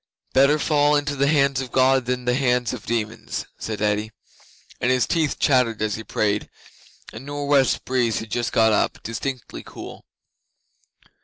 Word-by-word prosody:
'"Better 140 +3 +5
fall 150 -1 +2
into 145 0 0
the 140 0 +1
hands 140 -3 +2
of 130 -2 -7
God 130 -1 +3
than 125 0 -2
the 125 - +2
hands 125 -2 +1
of - - -8
demons," 115 -1 -3
said 110 -1 -4
Eddi, 105 +1 0 0.7
and 125 - 0
his 130 -1 +3
teeth 160 -4 0
chattered 125 -5 +2
as 110 -1 -1
he 110 - -5
prayed. 105 -1 -1 0.6
A 110 - -7
nor' 145 +2 -5
west 140 -2 +2
breeze 120 -4 +1
had 110 -2 -6
just 120 +1 -1
got 110 -1 +4
up - - +1
distinctly 125 +3 -5
cool. - - -11
125 Hz, 165 wpm, -23 LUFS, 110-140 Hz, 0.7 s, Better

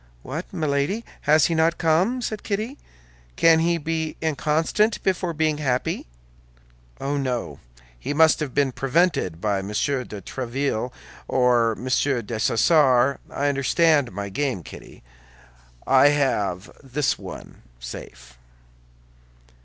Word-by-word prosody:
"What, 155 +7 -6
Milady! 155 +6 -1 0.2
has 155 -1 +6
he 170 - +1
not 165 +1 +2
come?" 180 +10 +1
said 215 -1 -3
Kitty. 220 +7 -3 0.6
"Can 165 -1 +5
he 170 +1 +2
be 160 0 -3
inconstant 160 +7 0
before 185 -2 0
being 155 -1 0
happy?" 130 - -1 0.9
"Oh, 140 +1 -2
no; 130 -4 -3 0.4
he - - -4
must 160 +2 +4
have 150 -4 -3
been 140 -2 +2
prevented 135 - 0
by 100 0 0
Monsieur 115 +7 -1
de 105 -4 -8
Tréville 125 +2 -3 0.4
or 120 -3 +3
Monsieur 130 +1 0
Dessessart. 130 +4 +3
I 145 - -1
understand 145 0 +2
my 100 +1 -5
game, 130 - -2
Kitty; - - -13 0.8
I 135 +1 +6
have 105 -10 0
this 135 +1 -1
one - - -10 0.2
safe." - - -10
140 Hz, 120 wpm, -23 LUFS, 125-160 Hz, 0.9 s, has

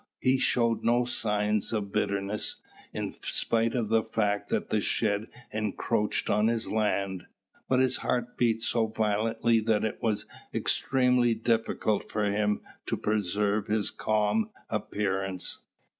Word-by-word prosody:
He 130 +1 +2
showed 120 -2 +2
no 120 +1 +3
signs 105 -3 +1
of 105 -3 -2
bitterness, 100 +2 -1 0.4
in - - -3
spite 115 +1 0
of 115 -4 -1
the 115 0 +4
fact 105 -2 -1
that - - -1
the 110 - +2
shed 105 +1 0 0.2
encroached 105 0 -1
on 105 +1 +3
his 115 -1 0
land; 100 -4 0 0.4
but 130 - +3
his 130 -1 +3
heart 125 -1 -2
beat 115 -2 +1
so 115 -1 +2
violently 110 +2 +1
that 110 -1 +1
it 110 - -3
was 110 -4 0 0.3
extremely 125 -3 +2
difficult 110 -2 0
for 105 - -1
him 105 0 +1 0.3
to - - -1
preserve 105 0 0
his 105 -2 +2
calm 110 - +1 0.2
appearance. 95 -3 -2
110 Hz, 135 wpm, -28 LUFS, 105-115 Hz, 0.4 s, the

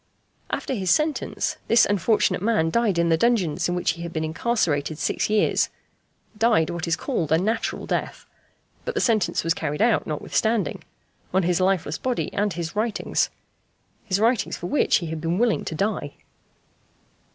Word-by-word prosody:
After - - -2
his 190 -6 -2
sentence, 305 - 0
this 230 0 +5
unfortunate 205 -2 +1
man 205 -7 +1
died 225 -4 +1
in 170 0 +2
the 165 - +4
dungeons 180 -8 +1
in 175 - 0
which 180 - +1
he 170 +1 -8
had 170 0 -5
been 160 -1 -2
incarcerated 155 -4 0
six 145 - -1
years 210 -1 +2 0.7
died 220 -7 +2
what 170 0 -4
is 165 - +2
called 175 - -2
a 160 - +5
"natural" 220 +6 -1
death; - - -3 0.6
but 485 - -4
the - - +1
sentence 225 - +1
was 165 0 +2
carried 150 -2 -3
out, 225 +1 +2
notwithstanding, 200 +4 -1 0.5
on 190 - +4
his 175 +1 +1
lifeless 185 -5 0
body 255 -2 -2
and 205 0 0
his 165 +1 -5
writings. 220 +1 0 0.7
His 185 +1 0
writings 230 0 +1
for - - -7
which 285 - +2
he 175 - +1
had 160 -1 -5
been 165 +2 -1
willing 230 0 +2
to 160 - -4
die! 195 -5 -2
185 Hz, 170 wpm, -24 LUFS, 165-225 Hz, 0.7 s, this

